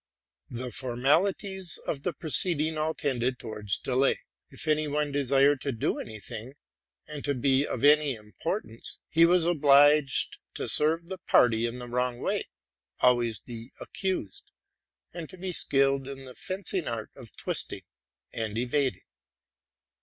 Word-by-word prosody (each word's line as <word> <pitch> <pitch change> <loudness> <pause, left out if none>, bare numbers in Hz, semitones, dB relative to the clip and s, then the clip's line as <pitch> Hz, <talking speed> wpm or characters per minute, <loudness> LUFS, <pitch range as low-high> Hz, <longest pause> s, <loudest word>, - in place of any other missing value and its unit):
The 125 +1 -5
formalities 165 - 0
of 140 - -3
the 180 - -2
proceeding 160 0 +2
all 155 +1 -2
tended 125 -2 -2
towards 105 -4 -3
delay: 130 +1 0 0.3
if - - -6
any 155 0 +1
one 150 0 -1
desired 140 0 +2
to 140 - -2
do 115 - -2
any 110 -1 -8
thing, 115 +6 -7 0.5
and 150 -2 -8
to 145 -1 -1
be 135 +3 +1
of - - -5
any 145 -2 +4
importance, 115 - -6
he 165 +1 +5
was 175 -1 +3
obliged 145 -3 +3 0.2
to - - -4
serve 160 +3 +8
the 190 +1 -7
party 120 -1 +3
in 120 +1 -6
the 125 -1 -8
wrong, 125 0 -2 0.4
— - - -44
always 120 -4 +2
the 115 0 -10
accused, 190 - -4 0.3
— - - -49
and 165 -2 -7
to 185 - -12
be 185 0 -5
skilled 135 -3 +1
in 135 -1 -9
the 130 - -11
fencing 185 -1 -3
art 115 -2 -5
of 120 -5 -11
twisting - - -1 0.5
and 110 -1 -4
evading. 130 +3 -1
140 Hz, 150 wpm, -27 LUFS, 120-155 Hz, 0.5 s, serve